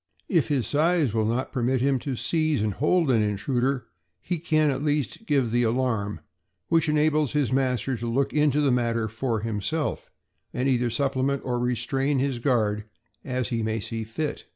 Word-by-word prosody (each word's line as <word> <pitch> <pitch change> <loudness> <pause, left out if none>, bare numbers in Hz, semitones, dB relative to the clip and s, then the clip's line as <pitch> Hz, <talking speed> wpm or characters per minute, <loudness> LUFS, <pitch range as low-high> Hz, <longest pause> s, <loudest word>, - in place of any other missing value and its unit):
If 165 -7 +2
his 140 -7 0
size 150 - +2
will 110 -1 +1
not 120 +4 -1
permit 130 0 0
him 135 +1 +2
to 135 +1 -3
seize 155 -2 +1
and 105 -2 0
hold 150 - +2
an 115 -3 +3
intruder, 120 +6 0 0.3
he 175 - -3
can 155 -2 +2
at 135 - -3
least 150 - -1
give 135 -6 +2
the 120 +1 +2
alarm, 115 -6 0 0.5
which 165 -2 +3
enables 150 -2 +2
his 145 -4 +1
master 130 -1 0
to 120 - -4
look 135 +3 0
into 150 -1 +3
the 140 -2 +3
matter 115 -2 +1
for 115 0 -2
himself, 115 +8 -2 0.5
and 125 +2 0
either 125 -2 +2
supplement 135 +2 0
or 125 -1 -1
restrain 135 +3 0
his 130 -2 0
guard, 110 -5 +1 0.4
as 125 -2 -2
he 115 -2 -1
may 110 0 -1
see 110 +2 -4
fit. 145 +7 -4
130 Hz, 175 wpm, -25 LUFS, 115-145 Hz, 0.5 s, an